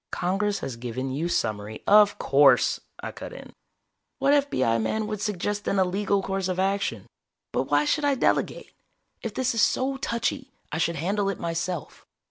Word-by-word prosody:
"Congress 195 Hz, +3 st, -1 dB
has 130 Hz, -3 st, -5 dB
given 125 Hz, +2 st, -4 dB
you 155 Hz, +6 st, -2 dB
summary 110 Hz, -5 st, -2 dB
" -, -, -34 dB
"Of 205 Hz, 0 st, +1 dB
course," 135 Hz, -2 st, +4 dB, 0.2 s
I -, -, -4 dB
cut -, -, -9 dB
in. -, -, -11 dB, 0.6 s
"What 275 Hz, +1 st, +3 dB
F.B.I. 130 Hz, -, +2 dB
man 215 Hz, -, -1 dB
would 210 Hz, -1 st, -4 dB
suggest 205 Hz, 0 st, -2 dB
an 200 Hz, -, +1 dB
illegal 195 Hz, +1 st, +1 dB
course 195 Hz, -1 st, -2 dB
of 185 Hz, -1 st, -2 dB
action? 190 Hz, -, -1 dB, 0.5 s
But 130 Hz, -, -1 dB
why 145 Hz, 0 st, +3 dB
should 295 Hz, -, +1 dB
I 285 Hz, -1 st, +3 dB
delegate? -, -, 0 dB, 0.5 s
If 230 Hz, -3 st, -5 dB
this 255 Hz, -1 st, 0 dB
is 225 Hz, -, +1 dB
so 270 Hz, +5 st, +1 dB
touchy, 260 Hz, +2 st, -2 dB, 0.2 s
I 155 Hz, -, -2 dB
should 170 Hz, 0 st, +1 dB
handle 195 Hz, +5 st, 0 dB
it 195 Hz, -, -4 dB
myself. 170 Hz, -2 st, -4 dB
190 Hz, 175 wpm, -26 LUFS, 145-210 Hz, 0.6 s, course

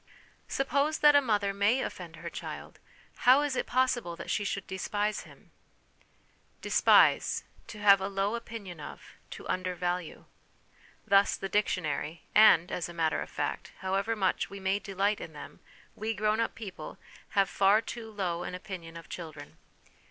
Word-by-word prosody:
Suppose 280 Hz, +3 st, 0 dB
that 295 Hz, -1 st, +6 dB
a 285 Hz, -, +7 dB
mother 205 Hz, -6 st, 0 dB
may 205 Hz, +6 st, +2 dB
offend -, -, -5 dB
her -, -, -7 dB
child, -, -, -8 dB, 0.4 s
how 260 Hz, +4 st, +5 dB
is 290 Hz, -3 st, -1 dB
it -, -, -1 dB
possible 245 Hz, -8 st, +1 dB
that 170 Hz, -, -6 dB
she 210 Hz, -, 0 dB
should 200 Hz, -1 st, -3 dB
despise 205 Hz, +2 st, -2 dB
him? -, -, -18 dB, 0.5 s
" -, -, -37 dB
Despise: -, -, +4 dB, 0.2 s
to 215 Hz, -, -9 dB
have 200 Hz, -2 st, +6 dB
a 190 Hz, -, -1 dB
low 200 Hz, +1 st, -1 dB
opinion 225 Hz, -7 st, -7 dB
of, 145 Hz, -, -10 dB, 0.2 s
to -, -, -9 dB
undervalue" 180 Hz, -2 st, -3 dB, 0.8 s
thus 200 Hz, -1 st, +4 dB
the 195 Hz, -, -5 dB
dictionary; 170 Hz, -6 st, -1 dB
and, 180 Hz, -5 st, +6 dB
as 175 Hz, 0 st, -3 dB
a 175 Hz, -, -10 dB
matter 160 Hz, -2 st, +1 dB
of -, -, -6 dB
fact, -, -, -4 dB
however 195 Hz, +4 st, 0 dB
much 195 Hz, -3 st, 0 dB
we 200 Hz, -, -8 dB
may 190 Hz, +1 st, 0 dB
delight 200 Hz, +1 st, -1 dB
in -, -, -8 dB
them, -, -, -10 dB, 0.4 s
we 220 Hz, +1 st, -3 dB
grown 215 Hz, +2 st, +1 dB
up 230 Hz, -, -1 dB
people 190 Hz, -8 st, -8 dB, 0.4 s
have 195 Hz, -1 st, +5 dB
far 200 Hz, +2 st, +4 dB
too 225 Hz, 0 st, -7 dB
low 185 Hz, -5 st, -2 dB
an 180 Hz, -, -5 dB
opinion 180 Hz, -4 st, -8 dB
of 165 Hz, -, -11 dB
children. 155 Hz, -4 st, -9 dB
200 Hz, 165 wpm, -30 LUFS, 180-220 Hz, 0.8 s, a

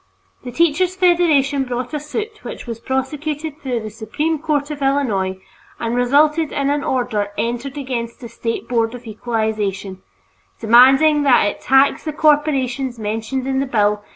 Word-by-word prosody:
The 250 Hz, -, -6 dB
Teachers' 340 Hz, +6 st, +1 dB
Federation 325 Hz, -7 st, +3 dB
brought 250 Hz, 0 st, -4 dB
a 300 Hz, -, -1 dB
suit 420 Hz, +9 st, -6 dB
which -, -, -7 dB
was 230 Hz, -1 st, -6 dB
prosecuted 295 Hz, +4 st, -3 dB
through 250 Hz, -4 st, -2 dB
the 215 Hz, 0 st, -7 dB
Supreme 290 Hz, +9 st, -2 dB
Court 295 Hz, -1 st, -1 dB
of 295 Hz, -1 st, -6 dB
Illinois 220 Hz, -10 st, 0 dB, 0.4 s
and 230 Hz, 0 st, -2 dB
resulted 295 Hz, +5 st, +3 dB
in 280 Hz, 0 st, 0 dB
an 290 Hz, -1 st, -1 dB
order 220 Hz, -5 st, -1 dB
entered 240 Hz, +4 st, -3 dB
against 245 Hz, -4 st, -4 dB
the 240 Hz, -, -8 dB
State 230 Hz, 0 st, -4 dB
Board 230 Hz, -1 st, 0 dB
of 245 Hz, 0 st, -11 dB
Equalization, 215 Hz, -4 st, -3 dB, 0.6 s
demanding 270 Hz, +6 st, +6 dB
that 265 Hz, -6 st, +4 dB
it 205 Hz, -, -3 dB
tax 270 Hz, +1 st, +3 dB
the 310 Hz, -, -4 dB
corporations 275 Hz, -5 st, +1 dB
mentioned 225 Hz, +4 st, -3 dB
in 265 Hz, 0 st, 0 dB
the 275 Hz, -, -1 dB
bill. 210 Hz, -3 st, +1 dB
265 Hz, 155 wpm, -19 LUFS, 230-295 Hz, 0.6 s, demanding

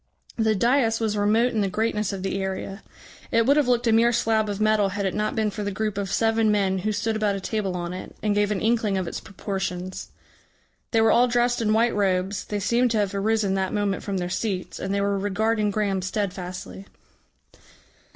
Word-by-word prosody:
The 220 Hz, -1 st, +2 dB
dais 235 Hz, +1 st, +2 dB
was 220 Hz, -2 st, 0 dB
remote 220 Hz, +4 st, +2 dB
in 220 Hz, -, +1 dB
the 200 Hz, -, 0 dB
greatness 215 Hz, 0 st, -1 dB
of 195 Hz, -1 st, -5 dB
the 195 Hz, 0 st, -2 dB
area; 190 Hz, +1 st, -4 dB, 0.5 s
it 230 Hz, 0 st, +3 dB
would 280 Hz, +3 st, +4 dB
have 295 Hz, -3 st, +3 dB
looked 245 Hz, -1 st, +2 dB
a 230 Hz, -, +3 dB
mere 230 Hz, +2 st, +4 dB
slab 220 Hz, -2 st, +1 dB
of 200 Hz, 0 st, -3 dB
metal 215 Hz, -2 st, +3 dB
had 200 Hz, +1 st, -3 dB
it 190 Hz, -, 0 dB
not 210 Hz, 0 st, -1 dB
been 215 Hz, -1 st, 0 dB
for 210 Hz, +1 st, -5 dB
the 205 Hz, -, -1 dB
group 210 Hz, +1 st, -2 dB
of 200 Hz, -1 st, -3 dB
seven 225 Hz, -1 st, +2 dB
men 195 Hz, -2 st, +1 dB
who 215 Hz, +4 st, -1 dB
stood 220 Hz, +2 st, -1 dB
about 210 Hz, -2 st, +1 dB
a -, -, -3 dB
table 195 Hz, -1 st, -2 dB
on 175 Hz, 0 st, -4 dB
it, 185 Hz, -, -8 dB
and 210 Hz, -1 st, +2 dB
gave 205 Hz, 0 st, +2 dB
an 205 Hz, -3 st, -1 dB
inkling 225 Hz, -3 st, +1 dB
of 185 Hz, -2 st, -2 dB
its -, -, -4 dB
proportions. 185 Hz, -2 st, -5 dB, 0.8 s
They 225 Hz, -, +2 dB
were 225 Hz, 0 st, +5 dB
all 245 Hz, +1 st, +5 dB
dressed 240 Hz, 0 st, +1 dB
in 215 Hz, -1 st, +1 dB
white 230 Hz, +2 st, +3 dB
robes, 190 Hz, -1 st, 0 dB
they 210 Hz, -, -3 dB
seemed 235 Hz, +5 st, +2 dB
to 225 Hz, -, 0 dB
have 205 Hz, -2 st, 0 dB
arisen 205 Hz, 0 st, +1 dB
that 190 Hz, -1 st, -1 dB
moment 205 Hz, -2 st, 0 dB
from 200 Hz, -2 st, -3 dB
their 175 Hz, -1 st, -2 dB
seats, 185 Hz, 0 st, -3 dB
and 190 Hz, -, -3 dB
they 200 Hz, 0 st, 0 dB
were 200 Hz, 0 st, 0 dB
regarding 210 Hz, +2 st, 0 dB
Graham 200 Hz, -2 st, 0 dB
steadfastly. 180 Hz, -, -5 dB
205 Hz, 220 wpm, -24 LUFS, 195-225 Hz, 0.8 s, were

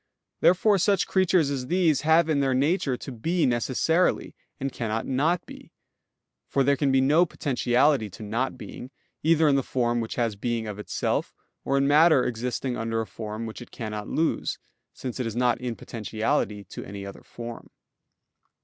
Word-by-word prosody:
Therefore 195 Hz, +3 st, +4 dB
such 195 Hz, +2 st, +2 dB
creatures 180 Hz, -6 st, +2 dB
as 130 Hz, -2 st, -3 dB
these 170 Hz, -3 st, +2 dB
have 160 Hz, +1 st, +4 dB
in 155 Hz, -3 st, +1 dB
their 135 Hz, -2 st, +2 dB
nature 140 Hz, -1 st, +1 dB
to 135 Hz, -, -8 dB
be 165 Hz, +9 st, 0 dB
necessarily, 130 Hz, +8 st, +1 dB, 0.3 s
and 135 Hz, 0 st, -2 dB
cannot 115 Hz, -2 st, -2 dB
not 155 Hz, +7 st, +1 dB
be; -, -, -13 dB, 0.8 s
for 135 Hz, -, +1 dB
there 140 Hz, +1 st, +3 dB
can 140 Hz, -1 st, +1 dB
be 135 Hz, -, +4 dB
no 150 Hz, +6 st, +5 dB
potentiality 130 Hz, -5 st, +1 dB
to 105 Hz, -, -10 dB
not 115 Hz, +5 st, -2 dB
being, 125 Hz, -, -9 dB, 0.3 s
either 160 Hz, 0 st, +4 dB
in 140 Hz, -, +4 dB
the -, -, +2 dB
form 120 Hz, -2 st, 0 dB
which 110 Hz, -, -5 dB
has 115 Hz, -3 st, 0 dB
being 115 Hz, +2 st, -2 dB
of 105 Hz, -1 st, -6 dB
itself, 105 Hz, -, -2 dB, 0.3 s
or 135 Hz, -, +1 dB
in 140 Hz, 0 st, +2 dB
matter 150 Hz, -2 st, +6 dB
existing 125 Hz, +2 st, -2 dB
under 115 Hz, 0 st, -2 dB
a 115 Hz, -, -1 dB
form 110 Hz, +1 st, -6 dB
which 110 Hz, +2 st, -7 dB
it 120 Hz, -, -10 dB
cannot 105 Hz, -2 st, -5 dB
lose, 160 Hz, 0 st, -1 dB, 0.3 s
since 130 Hz, -1 st, -6 dB
it 125 Hz, -, -1 dB
is 115 Hz, -, -5 dB
not 120 Hz, -1 st, +1 dB
in 125 Hz, -2 st, -3 dB
potentiality 110 Hz, 0 st, -2 dB
to 90 Hz, -, -9 dB
any 100 Hz, 0 st, -7 dB
other 100 Hz, -, -9 dB
form. 120 Hz, -1 st, -9 dB
130 Hz, 175 wpm, -26 LUFS, 115-150 Hz, 0.8 s, matter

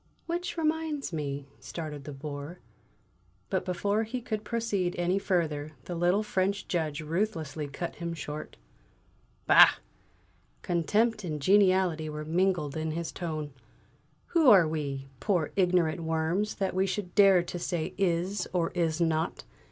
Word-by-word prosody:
"Which 345 Hz, +1 st, -3 dB
reminds 315 Hz, -, -1 dB
me 145 Hz, -2 st, -3 dB
" -, -, -29 dB
started 150 Hz, -4 st, -6 dB
the 150 Hz, -, -6 dB
Bore. 145 Hz, +3 st, -7 dB, 0.9 s
But -, -, 0 dB
before 200 Hz, +4 st, 0 dB
he 225 Hz, +3 st, -3 dB
could 220 Hz, -3 st, -4 dB
proceed 210 Hz, -6 st, -1 dB
any 175 Hz, +2 st, +1 dB
further 155 Hz, -6 st, -1 dB
the 180 Hz, -, -5 dB
little 175 Hz, +5 st, +2 dB
French 195 Hz, -1 st, -1 dB
Judge 160 Hz, -3 st, -1 dB
ruthlessly 160 Hz, -3 st, -2 dB
cut 155 Hz, +5 st, -5 dB
him 170 Hz, -1 st, -4 dB
short. 150 Hz, -1 st, -7 dB, 0.9 s
"Bah!" -, -, +8 dB, 0.9 s
Contempt 210 Hz, +6 st, +1 dB
and 155 Hz, -4 st, -3 dB
geniality 185 Hz, -2 st, +3 dB
were 150 Hz, 0 st, -5 dB
mingled 175 Hz, -3 st, +1 dB
in 160 Hz, 0 st, -2 dB
his 170 Hz, 0 st, -3 dB
tone. 155 Hz, -5 st, -4 dB, 0.8 s
"Who 325 Hz, -6 st, +5 dB
are 190 Hz, -7 st, +7 dB
we, 140 Hz, -3 st, -3 dB
poor 180 Hz, -7 st, 0 dB
ignorant 175 Hz, -4 st, +2 dB
worms, 165 Hz, +6 st, 0 dB
that 190 Hz, -2 st, -1 dB
we 190 Hz, +1 st, +1 dB
should 190 Hz, -2 st, -3 dB
dare 195 Hz, -3 st, +6 dB
to 175 Hz, 0 st, -6 dB
say 170 Hz, -2 st, -2 dB
'is' 185 Hz, +1 st, 0 dB
or 170 Hz, -2 st, +1 dB
'is 165 Hz, -2 st, 0 dB
not'? 160 Hz, 0 st, 0 dB
175 Hz, 145 wpm, -29 LUFS, 155-195 Hz, 0.9 s, Bah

